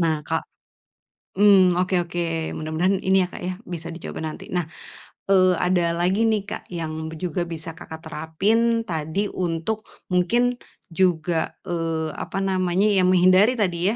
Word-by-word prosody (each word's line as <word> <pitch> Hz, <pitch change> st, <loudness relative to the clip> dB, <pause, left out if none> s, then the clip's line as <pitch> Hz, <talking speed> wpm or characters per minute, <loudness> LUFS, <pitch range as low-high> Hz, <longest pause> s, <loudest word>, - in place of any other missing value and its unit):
Nah, 155 Hz, -3 st, 0 dB
Kak -, -, -1 dB, 1.0 s
mmm, 195 Hz, -3 st, +7 dB
oke 185 Hz, -1 st, +1 dB
oke, 165 Hz, -1 st, -2 dB
mudah-mudahan 165 Hz, +5 st, 0 dB
ini 190 Hz, 0 st, +3 dB
ya, -, -, -5 dB
Kak, -, -, -8 dB
ya 180 Hz, 0 st, -4 dB
bisa 170 Hz, -3 st, -6 dB
dicoba 170 Hz, -1 st, -7 dB
nanti. 155 Hz, -1 st, -6 dB
Nah, 175 Hz, -3 st, -1 dB, 0.6 s
eee, 185 Hz, -2 st, +5 dB
ada 175 Hz, -1 st, +1 dB
lagi 190 Hz, +6 st, +2 dB
nih, 215 Hz, -3 st, +1 dB
Kak, -, -, -7 dB
yang 160 Hz, -2 st, -4 dB
b 160 Hz, -, -8 dB
juga 175 Hz, +1 st, -3 dB
bisa 165 Hz, 0 st, -5 dB
Kakak 160 Hz, -1 st, -10 dB
terapin 210 Hz, +9 st, +1 dB
tadi 165 Hz, +3 st, -2 dB
untuk 180 Hz, +5 st, -3 dB, 0.2 s
mungkin 240 Hz, +8 st, +2 dB, 0.3 s
juga, 170 Hz, -2 st, +1 dB
eee, 165 Hz, -2 st, -2 dB
apa -, -, -6 dB
namanya, 185 Hz, 0 st, +1 dB
ya 195 Hz, -, +3 dB
menghindari 185 Hz, +6 st, +5 dB
tadi 180 Hz, -3 st, 0 dB
175 Hz, 150 wpm, -23 LUFS, 165-190 Hz, 1.0 s, mmm